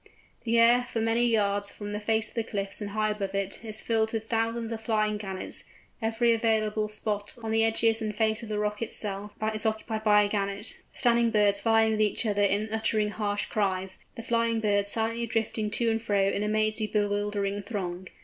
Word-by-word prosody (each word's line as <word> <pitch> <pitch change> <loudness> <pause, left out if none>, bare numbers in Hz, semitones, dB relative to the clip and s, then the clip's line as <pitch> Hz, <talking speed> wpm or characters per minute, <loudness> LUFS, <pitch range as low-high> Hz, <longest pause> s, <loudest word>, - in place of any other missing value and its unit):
The 230 0 +2
air, 235 +2 +6
for 240 -2 -4
many 225 +2 +2
yards 205 -3 +1
from 205 0 -7
the 210 - -3
face 220 +1 +1
of - - -13
the 230 - -1
cliffs 200 -1 -4
and 205 - -3
high 215 +1 0
above 200 -2 -4
it, 195 +2 -3
is 220 -1 -6
filled 220 -1 +1
with 220 -1 -3
thousands 230 0 -1
of 225 -1 -4
flying 215 -1 0
Gannets; 190 -2 -4 0.4
every 225 +1 +2
available 220 -2 +1
spot, 210 -1 -3
on 220 - -3
the 225 0 +3
edges 225 0 +3
and 215 -1 -3
face 220 0 +1
of 230 - -8
the 210 - -2
rock 210 0 -2
itself, 205 -2 -3 0.2
is 215 0 0
occupied 220 0 -2
by 210 -1 +5
a - - +1
Gannet, 200 +1 -3
the - - -17
standing 235 -2 +4
birds 205 -2 +3
vieing 225 0 +3
with 215 0 0
each 215 +2 +1
other 205 -1 +1
in 205 +1 +2
uttering 220 -1 +1
harsh 205 -1 -2
cries, 190 -2 -2 0.2
the 230 - -7
flying 230 0 +1
birds 205 -2 +3
silently 230 +1 +1
drifting 220 -1 -1
to 230 +2 +1
and 225 0 -1
fro 205 -3 +1
in 195 +1 0
a 210 - 0
mazy 215 0 +1
bewildering 205 -1 -1
throng. 190 -4 -5
215 Hz, 205 wpm, -28 LUFS, 205-225 Hz, 0.4 s, air